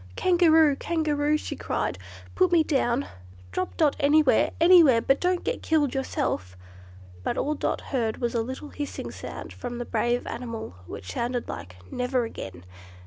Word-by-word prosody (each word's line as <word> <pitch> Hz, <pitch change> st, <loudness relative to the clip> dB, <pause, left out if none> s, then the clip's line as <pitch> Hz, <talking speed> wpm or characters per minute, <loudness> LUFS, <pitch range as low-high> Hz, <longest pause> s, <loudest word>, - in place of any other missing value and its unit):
"Kangaroo! 325 Hz, -5 st, +4 dB
Kangaroo!" 300 Hz, -2 st, 0 dB
she -, -, -5 dB
cried, -, -, -2 dB, 0.3 s
"put 370 Hz, -1 st, +3 dB
me 335 Hz, -2 st, +5 dB
down; 270 Hz, -3 st, +1 dB, 0.5 s
drop 185 Hz, -, -3 dB
Dot 300 Hz, -3 st, +3 dB
anywhere, 290 Hz, -3 st, +4 dB
anywhere, 330 Hz, -8 st, +7 dB
but 270 Hz, +4 st, +2 dB
don't 360 Hz, 0 st, +1 dB
get -, -, -2 dB
killed 300 Hz, -4 st, +1 dB
yourself!" 90 Hz, -, -2 dB, 0.6 s
But -, -, -2 dB
all 300 Hz, -, 0 dB
Dot -, -, -2 dB
heard 230 Hz, -5 st, -2 dB
was 240 Hz, -2 st, -2 dB
a 230 Hz, -, +1 dB
little 260 Hz, +5 st, -6 dB
hissing 290 Hz, -1 st, -5 dB
sound -, -, -8 dB
from 245 Hz, -1 st, -6 dB
the 240 Hz, -, -4 dB
brave 240 Hz, +2 st, 0 dB
animal, 230 Hz, -, -6 dB
which 90 Hz, +1 st, -7 dB
sounded 240 Hz, 0 st, -2 dB
like, 90 Hz, -1 st, -7 dB, 0.2 s
"Never 250 Hz, 0 st, 0 dB
again!" 90 Hz, -, -8 dB
270 Hz, 155 wpm, -26 LUFS, 235-310 Hz, 0.6 s, anywhere